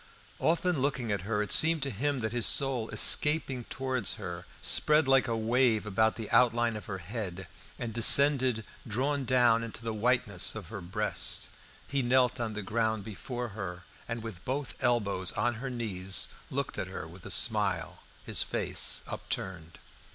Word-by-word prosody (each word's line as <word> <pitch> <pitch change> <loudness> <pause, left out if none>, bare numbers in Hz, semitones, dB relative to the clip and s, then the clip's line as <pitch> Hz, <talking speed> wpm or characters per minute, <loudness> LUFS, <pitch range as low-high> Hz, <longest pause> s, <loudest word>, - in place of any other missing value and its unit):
Often 170 0 0
looking 130 -5 -1
at 100 -3 -2
her, 105 -2 0
it 105 - -6
seemed 160 -2 +5
to 140 - -2
him 135 +4 -2
that 110 -1 -2
his 120 -3 +1
soul, 130 -5 +2
escaping 145 -5 +2
towards 130 -5 -2
her, - - -8
spread 150 -1 +2
like 135 -1 +3
a 115 -1 -1
wave 115 -1 +1
about 110 +2 +1
the 110 -2 -6
outline 120 -1 +3
of 105 - -8
her 95 - -5
head, 95 -1 -6 0.3
and 115 -2 -5
descended 130 -1 +6 0.2
drawn 135 +5 -1
down 120 -2 +3
into 115 0 -7
the 115 -1 -3
whiteness 110 -4 +1
of 100 -6 -8
her 100 -3 -7
breast. 105 +5 0 0.4
He 140 -1 0
knelt 125 0 +2
on 110 -3 -3
the 105 - -4
ground 110 0 -1
before 120 +3 -6
her, 95 -4 -7 0.3
and 115 -1 -4
with 105 -6 -9
both 135 +1 -4
elbows 100 -7 0
on 120 - 0
her 135 - -4
knees 95 -6 0 0.2
looked - - -4
at - - -3
her - - -7
with 85 +2 -14
a - - -9
smile, - - +3 0.2
his - - -2
face - - 0
upturned. 85 -4 -6
115 Hz, 170 wpm, -29 LUFS, 105-130 Hz, 0.4 s, descended